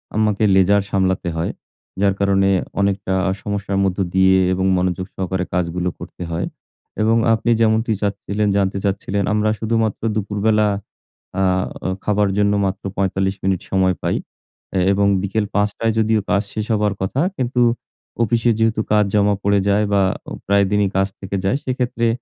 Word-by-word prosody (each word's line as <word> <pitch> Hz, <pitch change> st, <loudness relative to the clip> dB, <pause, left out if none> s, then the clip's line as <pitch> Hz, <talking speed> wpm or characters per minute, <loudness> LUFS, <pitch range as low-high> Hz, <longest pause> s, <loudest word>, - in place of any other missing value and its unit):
আমাকে 110 Hz, 0 st, +1 dB
লেজার 100 Hz, +2 st, +4 dB
সামলাতে 95 Hz, -2 st, 0 dB
হয়। 80 Hz, -, -1 dB, 0.5 s
যার 100 Hz, -1 st, +3 dB
কারণে 100 Hz, -1 st, +3 dB, 0.3 s
অনেকটা 100 Hz, -1 st, 0 dB, 0.3 s
সমস্যার 100 Hz, -1 st, -2 dB
মধ্য 95 Hz, -2 st, 0 dB, 0.2 s
দিয়ে 95 Hz, 0 st, +5 dB, 0.2 s
এবং 95 Hz, +1 st, -1 dB
মনোযোগ 90 Hz, 0 st, -1 dB
সহকারে 95 Hz, -1 st, -2 dB
কাজগুলো 90 Hz, 0 st, -1 dB
করতে -, -, -8 dB
হয় 85 Hz, +1 st, -1 dB, 0.6 s
এবং 110 Hz, +1 st, +3 dB, 0.2 s
আপনি 115 Hz, +1 st, +1 dB
যেমনটি 110 Hz, +1 st, +2 dB
চাচ্ছিলেন, 100 Hz, +1 st, -1 dB
জানতে 100 Hz, 0 st, 0 dB
চাচ্ছিলেন 100 Hz, 0 st, -1 dB
আমরা 105 Hz, 0 st, +2 dB
শুধুমাত্র 110 Hz, -1 st, 0 dB
দুপুরবেলা 105 Hz, +1 st, +1 dB, 0.7 s
আহ 95 Hz, -1 st, +2 dB, 0.4 s
খাবার 105 Hz, -1 st, +2 dB
জন্য 105 Hz, 0 st, +3 dB
মাত্র 95 Hz, 0 st, -3 dB
৪৫ 95 Hz, 0 st, 0 dB
মিনিট 95 Hz, -1 st, 0 dB
সময় 95 Hz, -1 st, +2 dB
পাই -, -, 0 dB, 0.6 s
এ -, -, +3 dB
এবং 100 Hz, +1 st, +2 dB, 0.2 s
বিকেল 105 Hz, +2 st, -1 dB
৫ 105 Hz, 0 st, +3 dB
টায় 115 Hz, -1 st, +1 dB
যদিও 110 Hz, 0 st, +2 dB
কাজ 100 Hz, -, +3 dB
শেষ 110 Hz, -, -2 dB
হবার 105 Hz, -1 st, +1 dB
কথা। 95 Hz, +8 st, -1 dB, 0.2 s
কিন্তু 125 Hz, -1 st, 0 dB, 0.6 s
অফিসে 115 Hz, +2 st, +2 dB
যেহেতু 110 Hz, 0 st, +2 dB
কাজ 105 Hz, -1 st, +4 dB
জমা 105 Hz, 0 st, +3 dB
পড়ে 100 Hz, 0 st, +3 dB
যায় 100 Hz, +1 st, +3 dB
বা 100 Hz, -, +4 dB, 0.3 s
ও -, -, -12 dB, 0.2 s
প্রায়দিনই 100 Hz, 0 st, +3 dB
কাজ 95 Hz, 0 st, +2 dB
থেকে 100 Hz, 0 st, -5 dB
যায় 115 Hz, +8 st, +2 dB
সেক্ষেত্রে 125 Hz, -2 st, -1 dB
100 Hz, 155 wpm, -20 LUFS, 95-105 Hz, 0.7 s, দিয়ে